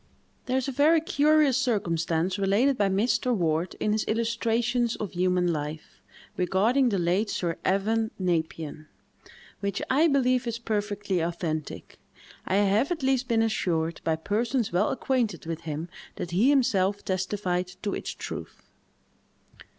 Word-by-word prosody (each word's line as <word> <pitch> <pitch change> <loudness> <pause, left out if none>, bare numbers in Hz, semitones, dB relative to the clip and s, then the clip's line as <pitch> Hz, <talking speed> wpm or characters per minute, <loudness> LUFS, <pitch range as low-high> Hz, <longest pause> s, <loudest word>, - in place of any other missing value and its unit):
There 255 +1 +1
is 265 - -1
a - - -1
very 300 +5 +4
curious 300 -3 +3
circumstance 180 - 0
related 205 +8 +3
by 205 -4 +1
Mr. 235 +5 +1
Ward, 165 -2 0
in 210 - 0
his 215 0 +1
"Illustrations 230 +1 0
of 210 - -5
Human 180 -1 +1
Life," 150 0 -6 0.4
regarding 215 +9 +2
the 200 - 0
late 180 +5 +1
Sir 170 -4 -2
Evan 220 +4 +1
Nepean, 160 -4 -2 0.7
which 200 0 -2
I 300 +5 +4
believe 255 -4 +2
is 230 -1 -2
perfectly 205 -4 -2
authentic. 165 -2 -4 0.5
I 190 - +1
have 205 - +2
at 325 -5 -2
least 265 -1 +1
been 225 -1 +2
assured, 170 -7 -1
by 160 - +1
persons 225 +7 -1
well 185 +5 +2
acquainted 245 -10 -1
with 165 0 -4
him, 155 +3 -4 0.3
that 175 - -5
he 205 +10 +3
himself 205 -8 +2
testified 185 -1 -1 0.2
to 205 - -1
its - - -4
truth. - - -7
205 Hz, 145 wpm, -27 LUFS, 175-240 Hz, 0.7 s, very